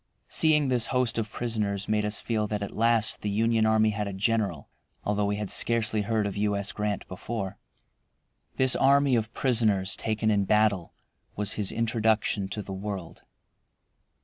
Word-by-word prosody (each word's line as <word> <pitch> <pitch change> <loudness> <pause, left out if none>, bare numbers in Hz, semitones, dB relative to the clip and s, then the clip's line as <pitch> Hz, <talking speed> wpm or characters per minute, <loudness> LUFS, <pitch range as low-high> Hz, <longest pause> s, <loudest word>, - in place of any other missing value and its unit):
Seeing 150 -3 +4
this 120 -3 +2
host 125 -2 0
of 110 -1 -4
prisoners 105 -4 -2
made 105 -1 +1
us 105 0 +1
feel 110 -2 -1
that 105 -1 -3
at 100 - -7
last 115 0 +2
the 105 - -2
Union 110 +2 +2
army 110 0 +3
had 105 0 -3
a 100 - -5
general, 100 -6 -1 0.4
although 105 0 0
we 100 - 0
had 105 -1 -3
scarcely 110 -2 +1
heard 110 0 0
of 100 - -3
U. 105 0 0
S. 100 0 -1
Grant 105 -1 -3
before. 95 +1 -5 1.0
This 130 -1 +2
army 140 -1 +4
of 110 -1 -1
prisoners 110 -7 +1
taken 110 0 -1
in 100 -1 +1
battle 105 -4 +1 0.4
was 105 0 -2
his 105 -3 -1
introduction 110 -3 0
to 105 +2 -5
the 95 - -7
world. 95 -3 -6
105 Hz, 170 wpm, -27 LUFS, 100-115 Hz, 1.0 s, Seeing